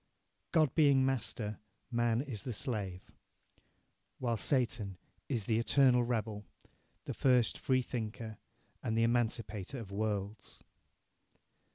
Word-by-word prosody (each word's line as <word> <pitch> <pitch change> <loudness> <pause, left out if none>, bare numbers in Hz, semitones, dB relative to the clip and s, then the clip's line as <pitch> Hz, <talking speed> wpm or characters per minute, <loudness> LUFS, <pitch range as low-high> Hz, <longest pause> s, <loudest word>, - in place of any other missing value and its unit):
God 155 -5 +4
being 140 -4 +5
master, 115 -5 -2 0.3
man 120 0 +2
is 120 -8 -6
the 125 - -3
slave." 100 -6 -3 1.1
While 120 -3 0
Satan 115 -5 0 0.3
is 115 -7 -1
"the 110 0 +2
eternal 125 0 +5
rebel, 110 -3 -2 0.6
the - - -3
first 125 -3 +3
freethinker 115 -4 -2 0.4
and 110 - -1
the 115 - +4
emancipator 115 -1 0
of 110 -5 -7
worlds." 105 0 -3
115 Hz, 105 wpm, -34 LUFS, 105-125 Hz, 1.1 s, being